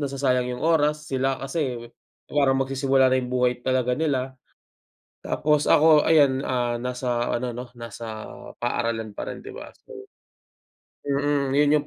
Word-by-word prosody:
nasasayang 135 -3 0
yung - - -5
oras. 150 -2 +2
Sila 135 0 0
kasi 135 -5 -4 0.4
parang 140 -2 +2
magsisimula 135 0 +2
na 130 - +3
yung 125 - -5
buhay 125 -1 +1
talaga 130 -1 +1
nila. 135 -4 -1 0.9
Tapos 150 0 +1
ako 155 -1 +6
ayan, 140 -4 +4
ah, 120 -2 -1
nasa 125 -1 -2
ano 120 0 -2
'no, 125 0 -8
nasa 115 -1 -7 0.3
paaralan 115 -3 -2
pa - - -4
rin - - -8
di - - -8
ba? - - -9 0.2
So - - -11 1.0
mhm, 140 -1 0
yun 145 0 +4
yung 145 - -13
130 Hz, 145 wpm, -24 LUFS, 125-145 Hz, 1.0 s, ako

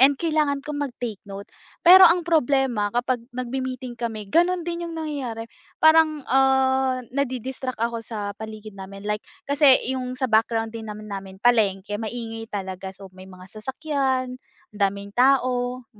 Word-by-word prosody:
and 275 +2 +6
kailangan 305 -3 0
kong 295 -1 -4
mag-take 245 -6 -4
note, 195 0 -7 0.4
pero 370 +2 +10
ang 350 0 +2
problema 270 -9 +2
kapag 245 0 0
nagme-meeting 255 0 -4
kami 225 -3 -4
ganun 350 - +2
din 345 0 -3
yung 330 - -7
nangyayari. 275 -8 -4 0.4
Parang, 315 -2 +5
ah, 265 -1 +3
nadi-distract 260 -1 -3
ako 230 0 -1
sa 205 -3 -4
paligid 215 0 -8
namin, 195 +1 -9
like 210 +1 -1 0.3
kasi 285 -2 +6 0.2
yung 255 -1 -4
sa 260 0 -1
background 225 0 +2
din 225 -1 -7
naman 210 0 -8
namin 195 -1 -7
palengke, 205 -4 +2
kaya 205 - -2
maingay 225 0 -5
talaga, 190 -2 -5
so 195 0 -12
may 185 0 -12
mga 185 -1 -13
sasakyan, 260 +1 -2 0.4
ang - - -11
daming 200 0 -1
tao, 250 -1 +2
250 Hz, 155 wpm, -24 LUFS, 215-275 Hz, 0.4 s, pero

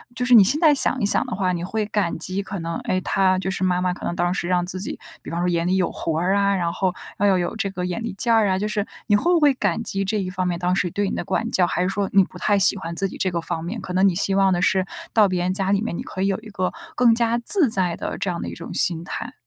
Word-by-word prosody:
就 250 - -2
是 250 - +3
你 205 - +9
现 270 +10 +2
在 310 -3 +5
想 265 -1 +5
一 205 - 0
想 205 - +3
的 250 - -5
话， 185 -2 0
你 175 -1 -4
会 215 +3 -2
感 205 -6 -2
激 185 +4 -1
可 195 -1 -6
能， 165 0 -4
诶， 185 - -1
她 185 0 +1
就 190 - -3
是 190 - -3
妈 180 -1 +1
妈 180 -1 0
可 - - -9
能 175 - -3
当 175 0 0
时 175 - -3
让 180 -1 0
自 185 +1 -5
己， 195 - -6 0.2
比 - - -10
方 170 - -3
说 180 - 0
眼 170 -1 0
里 185 - +1
有 185 - 0
活 160 -1 -3
儿 185 +3 +1
啊， 200 0 +2
然 170 -2 -1
后， 185 -2 -1 0.3
要 200 -2 +3
有 175 +4 -3
这 210 -2 -2
个 180 -2 -5
眼 180 +5 -4
力 230 - -4
见 235 -1 +3
儿 220 -2 +3
啊。 185 - +1
就 210 - -2
是 210 -1 -2 0.2
你 205 - +3
会 345 +12 +2
不 340 - +3
会 295 -3 +4
感 205 -2 -1
激 195 -3 -2
这 210 +2 -1
一 185 -2 -3
方 185 -1 -2
面 175 -1 -2
当 180 +1 0
时 185 -2 0
对 205 -1 -1
你 - - -4
的 - - -3
管 230 - -2
教， 185 - +2
还 180 - -2
是 180 - 0
说 195 0 -2
你 195 -1 +6
不 - - -11
太 205 - +1
喜 195 - +6
欢 170 -3 -6
自 195 +3 0
己 - - -10
这 185 - -1
个 170 -1 -2
方 160 0 -4
面， 200 +7 -5
可 180 - -7
能 190 +2 +3
你 190 - +1
希 195 +1 +1
望 195 -1 +3
的 175 - -1
是 190 0 +2 0.3
到 215 -2 +5
别 180 -2 -2
人 185 - 0
家 195 0 0
里 200 +1 +1
面， 225 -7 -4
你 - - -5
可 185 - -7
以 195 - +1
有 195 -1 -1
一 220 - -12
个 185 -3 -2 0.2
更 240 -2 +4
加 235 0 +1
自 305 - +6
在 185 -5 -1
的 - - -5
这 195 - -2
样 170 - -4
的 - - -5
一 - - -8
种 165 - -9
心 170 -2 +1
态？ 175 - -6
190 Hz, 350 characters per minute, -22 LUFS, 180-205 Hz, 0.3 s, 你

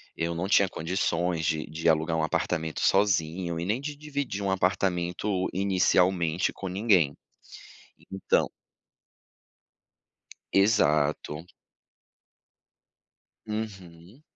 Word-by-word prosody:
eu 85 +1 -2
não 85 +3 -2
tinha 100 -1 +4
condições 85 -1 -1
de 80 0 0
de 80 +2 -1
alugar 80 +1 +2
um 80 - 0
apartamento 80 +1 -1
sozinho 85 -3 +1
e 85 - -3
nem 110 +7 -1
de 145 +1 -5
dividir 145 -8 -4
um 100 - 0
apartamento 90 +1 0
inicialmente 90 -2 +2
com 95 - -6
ninguém, 90 -6 +2 1.0
então 95 0 +1 2.1
Exato. 75 -6 +2 2.0
Uhum, 100 - -7
90 Hz, 90 wpm, -27 LUFS, 80-100 Hz, 2.1 s, tinha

